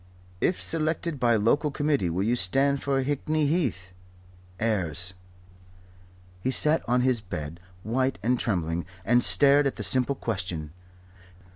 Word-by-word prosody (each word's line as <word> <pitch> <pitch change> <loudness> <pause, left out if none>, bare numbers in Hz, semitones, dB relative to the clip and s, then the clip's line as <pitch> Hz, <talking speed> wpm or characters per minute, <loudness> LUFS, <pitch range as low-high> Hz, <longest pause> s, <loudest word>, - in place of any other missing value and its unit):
"If 180 - 0
selected 160 -1 0
by 120 -2 +3
local 115 +8 +2
committee 145 - 0
will 90 +4 -1
you 115 +4 +1
stand 135 +7 +1
for 135 -1 0
Hickney 150 +2 -1
Heath? 125 - -2 0.7
Ayres." 90 -5 -1 1.3
He 130 - -1
sat 150 +4 +2
on 125 +1 +3
his 125 -3 +1
bed, 85 -4 -7 0.2
white 130 +3 -1
and 125 +2 +1
trembling, 85 -5 -2 0.2
and 120 +3 +3
stared 140 0 +5
at 135 - -3
the 105 - -6
simple 130 +7 0
question. 90 - -4
125 Hz, 135 wpm, -26 LUFS, 95-140 Hz, 1.3 s, stared